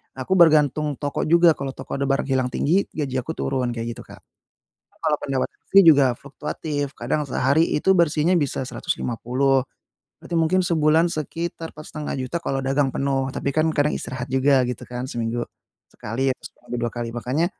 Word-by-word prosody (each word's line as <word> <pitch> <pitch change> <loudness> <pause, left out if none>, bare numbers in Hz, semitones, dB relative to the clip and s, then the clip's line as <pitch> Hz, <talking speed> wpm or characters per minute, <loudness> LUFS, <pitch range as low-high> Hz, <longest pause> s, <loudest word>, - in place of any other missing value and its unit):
aku 130 +7 -2
bergantung 150 -3 +4
toko 145 -1 -2
juga. 170 0 +5
Kalau 135 -1 -4
toko - - -6
ada 140 - -1
barang 135 0 0
hilang 130 -1 +1
tinggi, 180 +7 +2
gaji 140 -4 -3
aku 145 +6 -4
turun. 130 -5 -2
Kayak 115 0 -5
gitu, - - -8
Kak. - - -14 0.8
Kalau 150 - +1
pendapatan 135 -2 -2
istri 195 - +7
juga 140 -6 +6
fluktuatif. 145 +1 -5
Kadang 145 +5 -1
sehari 140 +6 +2
itu 150 - +2
bersihnya 165 +1 +3
bisa 145 -4 -1
Rp150.000. 130 +2 -1 0.6
Berarti - - -6
mungkin 170 +4 +2
sebulan 165 0 +3
sekitar 165 +2 -5
Rp4.500.000 150 -1 -5
kalau 135 -4 -2
dagang 135 +1 +2
penuh. 135 -1 0
Tapi 140 - -2
kan 155 +3 +2
kadang 150 +1 +2
istirahat 125 0 -4
juga 135 0 +4
gitu 125 0 -4
kan. 125 0 -5
Seminggu 120 -1 -2 0.5
sekali 130 +5 -2
atau - - -16
seminggu 120 0 -8
2 120 - 0
kali. 120 0 -5
Makanya 130 +8 0
140 Hz, 165 wpm, -23 LUFS, 130-155 Hz, 0.8 s, istri